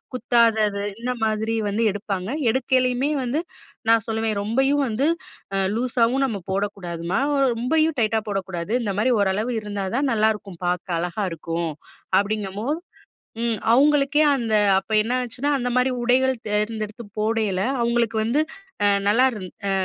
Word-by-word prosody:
குத்தாதது, 220 Hz, -5 st, +2 dB, 0.2 s
இந்த 250 Hz, +1 st, -1 dB
மாதிரி 220 Hz, +1 st, -1 dB, 0.2 s
வந்து 210 Hz, +3 st, 0 dB
எடுப்பாங்க. 195 Hz, -1 st, -4 dB, 0.2 s
எடுக்கைலயுமே 255 Hz, +2 st, +1 dB
வந்து 260 Hz, +6 st, -1 dB, 0.5 s
நான் 225 Hz, -2 st, +4 dB
சொல்லுவேன், 220 Hz, -1 st, -1 dB
"ரொம்பயும் 270 Hz, +6 st, +2 dB
வந்து 230 Hz, +5 st, 0 dB, 0.5 s
அ -, -, +1 dB, 0.2 s
லூஸாவும் 245 Hz, +2 st, +1 dB
நம்ம 225 Hz, -7 st, -3 dB
போடக்கூடாதும்மா, 190 Hz, -2 st, -2 dB, 0.4 s
ரொம்பயும் 310 Hz, +6 st, +1 dB
டைட்டா 220 Hz, 0 st, +2 dB
போடக்கூடாது. 190 Hz, -2 st, -3 dB
இந்த 205 Hz, -3 st, -1 dB
மாரி 255 Hz, +4 st, +3 dB
ஓரளவு 200 Hz, +5 st, 0 dB
இருந்தா 205 Hz, -2 st, -4 dB
தான் 280 Hz, 0 st, +1 dB
நல்லாயிருக்கும், 210 Hz, -5 st, 0 dB
பார்க்க 180 Hz, 0 st, -1 dB
அழகா 180 Hz, +4 st, -2 dB
இருக்கும்." 165 Hz, 0 st, -3 dB, 0.5 s
அப்படீங்கும்போது 210 Hz, -, -2 dB, 0.6 s
ம். 230 Hz, -2 st, 0 dB
அவுங்களுக்கே 290 Hz, +3 st, +4 dB
அந்த 230 Hz, -4 st, -1 dB, 0.2 s
அப்ப 205 Hz, -, -6 dB
என்ன 235 Hz, +3 st, -2 dB
ஆச்சுன்னா 255 Hz, +5 st, -3 dB
அந்த 245 Hz, -1 st, -1 dB
மாரி 250 Hz, +1 st, +3 dB
உடைகள் 260 Hz, +2 st, +3 dB
தேர்ந்தெடுத்து 215 Hz, +1 st, -2 dB, 0.2 s
போடையில, 215 Hz, -3 st, 0 dB, 0.2 s
அவுங்களுக்கு 235 Hz, -1 st, +1 dB
வந்து 245 Hz, +7 st, +1 dB, 0.4 s
அ -, -, +5 dB, 0.2 s
நல்லா 230 Hz, +6 st, +4 dB
இருந் 210 Hz, -6 st, -7 dB, 0.2 s
அ -, -, +1 dB
220 Hz, 135 wpm, -23 LUFS, 200-250 Hz, 0.6 s, அ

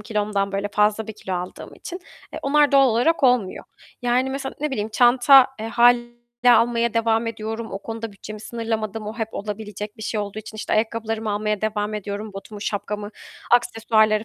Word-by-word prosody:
kilomdan 205 Hz, -2 st, -1 dB
böyle 200 Hz, +1 st, -1 dB
fazla 210 Hz, +1 st, +1 dB
bir 220 Hz, -, -6 dB
kilo 190 Hz, -3 st, -5 dB
aldığım 180 Hz, +1 st, -6 dB
için, 360 Hz, +1 st, -8 dB, 0.3 s
eee, -, -, -5 dB
onlar 290 Hz, +1 st, +3 dB
doğal 275 Hz, -1 st, +6 dB
olarak 250 Hz, +8 st, +2 dB
olmuyor, 245 Hz, -7 st, +2 dB, 0.4 s
yani, 250 Hz, +2 st, +1 dB
mesela, 270 Hz, 0 st, -4 dB
ne 300 Hz, -, -1 dB
bileyim, 215 Hz, -4 st, -2 dB
çanta, 250 Hz, +3 st, +6 dB
eee, 220 Hz, -, -3 dB
hâliyle 240 Hz, +1 st, +4 dB, 0.4 s
almaya 235 Hz, 0 st, +3 dB
devam 230 Hz, 0 st, +2 dB
ediyorum, 225 Hz, 0 st, -5 dB
o 195 Hz, -, -3 dB
konuda 225 Hz, +1 st, -6 dB
bütçemi 210 Hz, +1 st, -9 dB
sınırlamadım, 225 Hz, -2 st, -4 dB
o 215 Hz, -, -5 dB
hep 225 Hz, -1 st, -2 dB
olabilecek 210 Hz, 0 st, -6 dB
bir 220 Hz, -, -9 dB
şey 215 Hz, 0 st, -2 dB
olduğu 205 Hz, +1 st, -5 dB
için, 220 Hz, 0 st, -9 dB
işte, -, -, -4 dB
ayakkabılarımı 220 Hz, 0 st, -1 dB
almaya 210 Hz, 0 st, -1 dB
devam 215 Hz, -1 st, -1 dB
ediyorum, 205 Hz, +1 st, -5 dB
botumu, 200 Hz, +1 st, -9 dB
şapkamı, 205 Hz, 0 st, -3 dB, 0.4 s
aksesuarları 225 Hz, -2 st, +3 dB
220 Hz, 175 wpm, -23 LUFS, 210-235 Hz, 0.4 s, doğal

